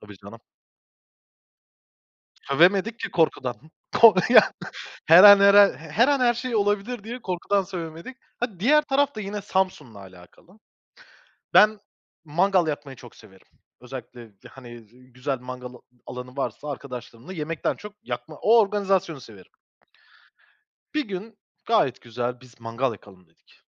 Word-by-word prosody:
Tabii 105 -1 -14
canım. 100 +4 -14 2.0
Sövemedik 190 +10 +2
ki - - -5
korkudan. 135 -6 0 0.5
Ko 230 -1 +9
ya, 225 -3 +6 0.5
her 170 +5 +8
an, 200 -1 +10
her 200 0 +6
an, 205 -1 +7
her 165 - 0
an 285 -2 +1
her 240 -1 +3
şey 245 -1 -4
olabilir 205 +2 -1
diye 240 +2 -8
korkudan 195 +2 -1
sövemedik. 170 +6 -8 0.2
Ha, 215 -8 -4
diğer 300 +8 +4
taraf 285 -1 0
da 215 - -6
yine 205 0 -5
Samsun'la 185 - -3
alakalı. 95 - -17 1.0
Ben 215 0 +5 0.4
mangal 175 +3 +1
yakmayı 145 -3 -5
çok - - -15
severim. 95 -4 -19 0.3
Özellikle, 125 -3 -11 0.2
hani, 120 -2 -13 0.3
güzel 130 +1 -4
mangal 125 0 -9 0.3
alanı 125 +1 -9
varsa, 145 +2 -4
arkadaşlarımla 125 +2 -9
yemekten 160 -1 -3
çok 210 0 -11
yakma - - -7
O 230 +2 +5
organizasyonu 195 -6 0
severim. 100 -5 -15 1.4
Bir 300 -6 -2
gün 205 +3 -8 0.3
gayet 220 - +1
güzel 120 +1 -5
biz 125 -2 -20
mangal 115 +3 -2
yakalım 95 -4 -16
dedik. 80 - -29
165 Hz, 130 wpm, -24 LUFS, 125-210 Hz, 2.0 s, an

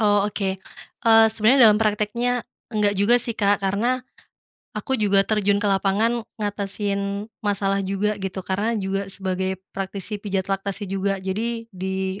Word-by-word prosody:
Oh, 205 -1 +3
oke. 195 -2 -2 0.5
Eee, 225 -1 +7
sebenarnya 230 +3 +6
dalam 210 0 +4
prakteknya, 220 +3 0 0.3
enggak 210 -2 +2
juga 205 +5 +4
sih 235 -1 -1
Kak, 205 -1 +2
karena, 235 +7 +1 0.8
aku 265 - -3
juga 200 -1 +4
terjun 205 -1 +2
ke 205 - -2
lapangan 205 +4 +2 0.2
ngatasin 200 -1 -2 0.2
masalah 200 -1 0
juga 200 +2 -1
gitu. 190 -1 -4
Karena 210 +5 -1
juga 195 -1 -2
sebagai 190 -1 -2 0.2
praktisi 195 +2 -4
pijat 195 -1 -2
laktasi 195 +1 -2
juga, 195 0 -1
jadi, 220 +5 -3
di 190 +1 -3
200 Hz, 145 wpm, -23 LUFS, 195-215 Hz, 0.8 s, Eee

